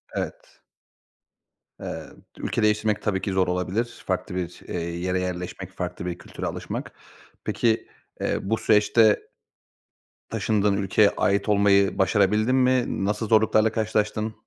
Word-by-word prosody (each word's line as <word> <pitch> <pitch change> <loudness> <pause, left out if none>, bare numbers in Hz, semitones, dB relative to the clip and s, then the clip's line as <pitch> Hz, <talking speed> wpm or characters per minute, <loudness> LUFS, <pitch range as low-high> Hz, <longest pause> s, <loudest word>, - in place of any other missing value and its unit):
Evet. - - -6 1.2
Eee, - - -5 0.3
ülke 115 - -2
değiştirmek 105 0 +2
tabii 95 -3 -1
ki 100 - -2
zor 95 -1 +2
olabilir. 90 +7 -2
Farklı - - -2
bir, 90 -1 -4
eee, 90 - -3 0.2
yere 90 +1 -1
yerleşmek, 90 +1 -5
farklı 90 -2 -5
bir 90 -1 -3
kültüre - - -8
alışmak. - - -5 0.5
Peki, 115 -1 +1 0.3
eee, - - 0
bu 110 +3 -1
süreçte 110 0 +4 1.1
taşındığın 105 -2 +1
ülkeye 100 +1 +4
ait 100 +2 +1
olmayı 100 -1 +4
başarabildin 105 +5 +3
mi? 125 -5 +2
Nasıl 105 +2 -1
zorluklarla 110 0 +4
karşılaştın? 110 0 -1
105 Hz, 125 wpm, -25 LUFS, 95-110 Hz, 1.2 s, süreçte